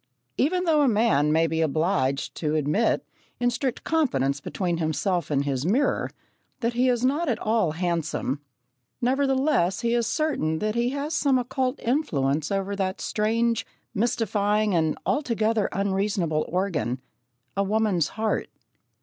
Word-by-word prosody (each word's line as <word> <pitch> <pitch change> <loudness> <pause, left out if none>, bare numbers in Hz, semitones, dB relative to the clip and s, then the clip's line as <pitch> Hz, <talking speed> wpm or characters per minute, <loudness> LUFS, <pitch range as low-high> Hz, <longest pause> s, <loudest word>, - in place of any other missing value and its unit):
Even 360 +6 +1
though 320 -4 +3
a 285 - +4
man 210 - +3
may 160 +1 +3
be 160 0 0
obliged 155 -3 0
to 155 -1 -1
admit, 155 +9 +1 0.3
in 245 0 +2
strict 255 +1 -2
confidence 140 - +1
between 175 +1 -2
himself 170 +3 -1
and 140 -1 +1
his 135 -2 -1
mirror, 235 - +1 0.5
that 235 0 0
he 250 +2 +2
is 245 0 +1
not 295 +5 +1
at 235 - +1
all 215 -7 +1
handsome, 160 -5 -2 0.6
nevertheless 265 - +1
he 235 0 +1
is 235 -2 +1
certain 230 - 0
that 215 +4 -1
he 235 +1 +1
has 285 +3 -3
some 280 -3 +3
occult 255 +1 -1
influence 155 - 0
over 195 0 -1
that 190 -1 -2
strange, 230 +1 0 0.3
mystifying, 210 -2 +1
and 160 -3 +1
altogether 225 -6 +1
unreasonable 195 -5 0
organ 165 - -1 0.6
a 200 - +2
woman's 200 -5 +1
heart. 220 0 -1
210 Hz, 140 wpm, -25 LUFS, 160-245 Hz, 0.6 s, a